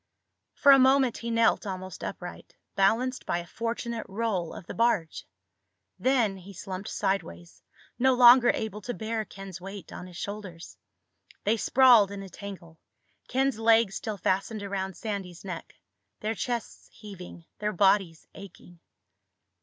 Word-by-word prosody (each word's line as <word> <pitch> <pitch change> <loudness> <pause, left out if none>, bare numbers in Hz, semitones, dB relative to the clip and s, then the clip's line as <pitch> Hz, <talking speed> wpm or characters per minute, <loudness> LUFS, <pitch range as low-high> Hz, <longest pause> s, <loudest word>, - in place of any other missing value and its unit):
For 280 - +6
a 275 - +8
moment 265 -2 +4
he 235 - -5
knelt 230 -2 +2
almost 185 -2 -6
upright, 180 -1 -7 0.2
balanced 235 +6 +2
by - - 0
a 175 - -5
fortunate 230 +2 -4
roll 195 -5 -2
of - - -9
the - - -7
barge. 215 -8 0 0.7
Then 240 -7 +2
he 190 +2 -12
slumped 190 +1 -6
sideways, 160 - -3 0.4
no 260 +1 +4
longer 245 0 +8
able 215 -1 -4
to 245 +4 -5
bear 220 0 -3
Ken's 195 -2 -10
weight 195 +1 -9
on 180 - -8
his 175 -1 -11
shoulders. 200 -5 -7 0.7
They 215 +2 +2
sprawled 240 -3 +5
in 200 -1 -7
a 195 - -10
tangle, 175 -4 -10 0.5
Ken's 265 -2 0
legs 225 -2 +4
still 215 -1 -4
fastened 195 +3 -1
around 190 -2 -4
Sandy's 195 -5 -5
neck, 180 -3 -7 0.5
their 220 - -1
chests 240 0 -4
heaving, 180 -5 -11
their 210 0 -1
bodies 190 -3 +2
aching. 180 -3 -13
200 Hz, 145 wpm, -27 LUFS, 185-230 Hz, 0.7 s, a